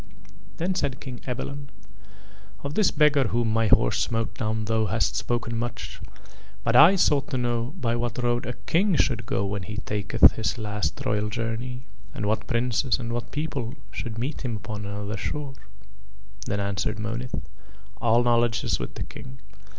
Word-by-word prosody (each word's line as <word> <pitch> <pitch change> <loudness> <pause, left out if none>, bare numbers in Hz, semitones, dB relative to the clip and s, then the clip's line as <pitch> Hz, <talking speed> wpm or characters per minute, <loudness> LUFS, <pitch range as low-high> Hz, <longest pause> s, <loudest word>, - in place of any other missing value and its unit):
Then 180 +3 0
said 135 -8 -1
King 130 -3 -7
Ebalon: 140 +3 -4 1.0
"Of 140 +1 -3
this 210 +2 +4
beggar 150 -2 +4
whom 110 +2 +1
my 115 0 +3
horse - - +4
smote 115 -2 0
down 110 0 -1
thou 110 0 +1
hast 110 +4 +1
spoken 115 -1 -1
much, 120 +1 -4 0.6
but 115 0 +1
I 165 +9 +9
sought 145 -6 +3
to 130 - -1
know 120 +3 -1
by 115 -4 +1
what 120 -1 -2
road 120 -1 0
a 125 - -2
King 190 +2 +3
should 115 -6 +1
go 110 -7 0
when 100 0 -2
he 105 +4 -6
taketh 105 -3 +4
his 110 +1 -2
last 105 -2 -2
royal 105 0 +1
journey, 120 +3 -3 0.3
and 105 - -2
what 110 +1 0
princes 120 +1 +1
and 115 -2 -4
what 120 0 -3
people 140 -5 -3 0.2
should 115 -1 -5
meet 130 +6 -3
him 120 -4 -2
upon 105 -1 -6
another 100 +1 -4
shore." 145 +5 -3 0.9
Then 100 - -1
answered 100 +2 -1
Monith: 115 +3 -3 0.7
"All 120 0 +4
knowledge 120 -1 +3
is - - 0
with - - -5
the - - -3
King. 130 +4 -10
115 Hz, 170 wpm, -26 LUFS, 110-130 Hz, 1.0 s, I